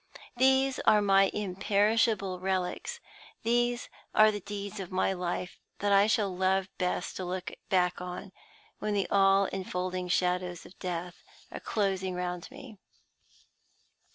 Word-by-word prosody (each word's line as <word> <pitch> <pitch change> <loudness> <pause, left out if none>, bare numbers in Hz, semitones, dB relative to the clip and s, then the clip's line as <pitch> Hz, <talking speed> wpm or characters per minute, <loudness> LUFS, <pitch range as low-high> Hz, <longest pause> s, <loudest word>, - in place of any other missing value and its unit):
These 265 +1 +3
are 210 - +5
my 195 -1 +4
imperishable 200 0 +1
relics; 190 - -2 0.4
these 240 +1 +1 0.3
are 215 0 +7
the 205 - -4
deeds 205 +1 -6
of 190 -2 -6
my 185 +1 +1
life 180 0 -4 0.2
that 205 0 0
I 200 +1 +6
shall 205 -3 +1
love 190 +1 +1
best 180 -1 -1
to 185 - -4
look 180 0 -4 0.2
back 180 -1 +2
on, 180 +1 -6 0.5
when 210 -1 -1
the 200 - +1
all 195 0 +5
infolding 185 -1 -3
shadows 180 -1 0
of 185 - -16
death 180 0 -5 0.3
are - - -6
closing 190 -3 -1
round 180 -1 -4
me. 260 -6 -12
195 Hz, 135 wpm, -29 LUFS, 180-210 Hz, 0.5 s, are